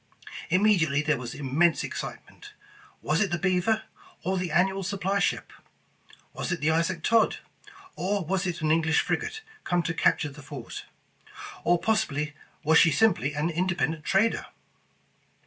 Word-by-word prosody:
Immediately 170 -6 +3
there 150 -3 +1
was 120 -2 -6
immense 150 +3 +2
excitement. - - -7 0.5
Was 160 +5 +1
it 205 - +2
the 175 - -1
Beaver, 190 +4 +1 0.4
or 190 - 0
the 180 -2 -3
annual 190 +2 +2
supply 195 +1 -1
ship? - - -1 0.8
Was - - -4
it 170 - -1
the 150 +2 +2
Isaac 165 +1 0
Todd, 230 -1 +3 0.6
or 195 0 -1
was 190 +3 -1
it 170 -2 -3
an 155 0 +1
English 160 -1 +3
frigate 435 0 -2 0.2
come 175 -1 +1
to 165 - -2
capture 150 -2 +2
the 145 +1 -12
fort? 135 -4 -8 0.8
Or 175 - +4
possibly, 150 -9 0 0.3
was 160 +1 +5
she 160 - +6
simply 150 -3 +2
an 155 +3 0
independent 165 -3 -1
trader? 205 +7 +1
170 Hz, 145 wpm, -27 LUFS, 150-195 Hz, 0.8 s, she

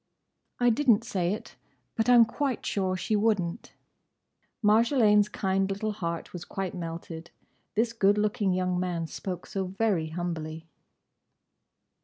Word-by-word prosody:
"I 245 -1 +4
didn't 235 -3 +3
say 180 -2 -1
it; 210 - -6 0.4
but 225 +2 +1
I'm 240 -2 +8
quite 260 +2 -2
sure 185 -2 0
she 215 - -1
would 210 0 +3
n't." 175 +5 -5 0.9
Marjolaine's 210 -1 +4
kind 195 -1 0
little 200 +2 -2
heart 170 -5 -4
was 175 -1 -6
quite 190 -1 -4
melted. 165 -1 -7 0.5
This 225 +2 +1
good 205 -2 +3
looking 210 -1 +1
young 180 -1 0
man 175 -2 -2
spoke 180 +2 -6
so 195 -1 -3
very 195 -4 0
humbly. 160 -1 -5
195 Hz, 135 wpm, -28 LUFS, 175-220 Hz, 0.9 s, I'm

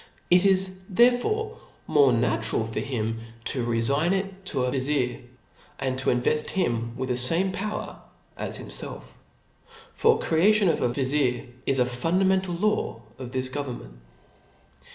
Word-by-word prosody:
It 180 +2 +6
is 190 -1 +2
therefore 250 - +2 0.3
more 140 -3 +4
natural 115 -1 +2
for 115 - -4
htm 115 -2 -3 0.3
to 125 - -2
refign 135 +9 +1
it 195 0 -4
to 135 -6 -1
a 125 - 0
vizir 130 -2 -1 0.3
*, - - -28
and 130 -2 -1
to 130 - 0
invert 125 +5 +2
him 115 -9 -1
with 130 0 -3
the 125 - +1
fame 165 +10 +3
power 210 +3 -5 0.3
as - - -2
himfelf. - - -6 0.9
The 455 0 +5
creation 195 +4 +3
of - - 0
a - - +2
vizir 130 0 0 0.2
is 135 - +3
a 125 - +3
fundamental 180 +8 +1
law 190 - -1 0.2
of 130 -2 -6
this 130 0 -2
government. 125 - -6
140 Hz, 145 wpm, -25 LUFS, 125-190 Hz, 0.9 s, It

